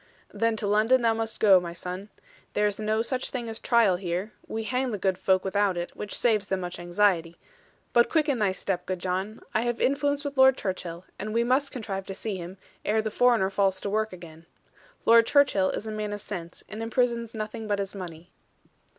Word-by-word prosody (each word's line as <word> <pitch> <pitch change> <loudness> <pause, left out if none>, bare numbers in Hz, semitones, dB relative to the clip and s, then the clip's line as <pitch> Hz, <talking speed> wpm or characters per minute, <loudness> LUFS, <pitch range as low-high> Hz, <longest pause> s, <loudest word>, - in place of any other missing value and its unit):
'Then 225 +2 +1
to 215 - -3
London 220 +5 +3
thou 230 -1 +4
must 225 0 -3
go, 195 -4 +7
my 170 -1 -6
son. 180 +4 -6 0.4
There 210 - +2
is 205 0 0
no 215 +1 +1
such 255 +2 -2
thing 245 -3 -4
as 225 0 -5
trial 225 -7 +3
here: 185 +3 -3
we 225 0 -3
hang 255 +3 -1
the 215 - -2
good 190 -1 +1
folk 185 +1 +1
without 195 -1 +1
it, 175 0 -4
which 210 - -3
saves 215 -4 +2
them 190 -2 -1
much 175 0 -5
anxiety. 175 -2 +1 0.6
But 240 0 +5
quicken 300 -6 +2
thy 205 -3 +2
step, 190 -1 -3
good 185 - -1
John; 190 +4 -3
I 220 - +2
have 240 0 -1
influence 285 +1 +1
with 285 -1 -4
Lord 265 0 +6
Churchill, 180 -2 -4
and 215 +2 -4
we 235 - +3
must 265 +4 +1
contrive 195 -6 -5
to 195 - -5
see 210 0 -3
him, 180 +1 -7 0.3
ere 220 +1 +1
the 220 - -2
foreigner 235 -5 +3
falls 195 -1 +1
to 200 - -3
work 215 +1 0
again. 170 -2 -12 0.6
Lord 230 0 +6
Churchill 265 -10 +4
is - - -4
a 220 - -4
man 210 -1 -3
of 205 - -5
sense, 175 -5 -7
and 215 +1 -7
imprisons 235 0 0
nothing 215 +1 -5
but 205 -1 +1
his 200 -1 -3
money.' 175 -3 -8
210 Hz, 210 wpm, -27 LUFS, 190-230 Hz, 0.6 s, go